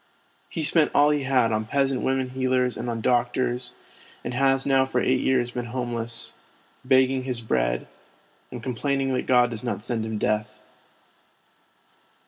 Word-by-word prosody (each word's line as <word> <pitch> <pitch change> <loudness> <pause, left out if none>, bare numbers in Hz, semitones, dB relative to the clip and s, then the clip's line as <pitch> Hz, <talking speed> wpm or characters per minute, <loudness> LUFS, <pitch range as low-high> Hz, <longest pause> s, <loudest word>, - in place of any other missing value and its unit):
He 160 - -3
spent 155 0 +4
all 145 +1 +5
he 145 -2 0
had 125 -4 +2
on 110 0 -1
peasant 135 +1 0
women 130 -1 -1
healers 130 -1 0
and 120 - -4
on 115 -1 -3
doctors, 125 +1 0 0.5
and 125 - -4
has 135 +1 +2
now 135 -1 +4
for 130 -1 -1
eight 130 +1 +2
years 125 -2 +1
been 125 -1 -4
home 120 0 -4
less, 115 0 -2 0.5
begging 130 0 +3
his 125 -2 -3
bread, - - 0 0.6
and 125 -2 -8
complaining 135 +2 -1
that 125 - -2
God 125 -1 +4
does 115 -1 -4
not 120 -4 -3
send 120 -2 -1
him 110 -1 -3
death. 105 0 -1
125 Hz, 160 wpm, -25 LUFS, 120-130 Hz, 0.6 s, all